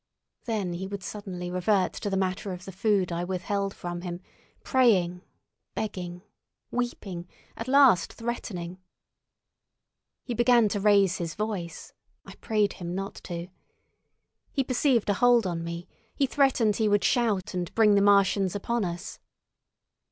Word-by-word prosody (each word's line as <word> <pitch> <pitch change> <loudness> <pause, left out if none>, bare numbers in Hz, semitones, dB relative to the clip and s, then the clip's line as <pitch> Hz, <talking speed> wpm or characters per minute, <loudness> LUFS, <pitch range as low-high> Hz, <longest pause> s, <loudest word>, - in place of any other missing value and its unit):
Then 210 -6 -2
he 185 +2 -4
would 200 -1 -6
suddenly 180 -4 -6
revert 185 +1 +1
to 205 - -4
the 195 - 0
matter 190 +1 -1
of 180 0 -7
the 195 - -7
food 195 -1 +1
I 170 +1 -2
withheld 195 +2 -2
from 175 0 -5
him, 175 -1 -5 0.4
praying, 185 -9 +3 0.5
begging, 180 -4 -4 0.5
weeping, 200 -8 -3 0.3
at 225 - -6
last 260 -9 +5
threatening. 190 -7 -5 1.4
He 245 - -4
began 240 -1 +4
to 205 - -1
raise 200 -2 +4
his 170 -2 -4
voice—I 200 -6 -7
prayed 210 -3 +1
him 175 -1 -6
not 195 +1 -4
to. 175 0 -5 1.0
He 270 - 0
perceived 255 -2 +2
a 205 - +3
hold 240 +1 +4
on 170 -2 -2
me—he 175 +10 -4
threatened 260 -6 +2
he 220 - +2
would 205 -1 +3
shout 220 -8 +1
and 175 -2 -3
bring 215 -2 +5
the 200 - +4
Martians 200 -1 +4
upon 235 +3 -1
us. 175 -1 -5
200 Hz, 140 wpm, -27 LUFS, 180-225 Hz, 1.4 s, last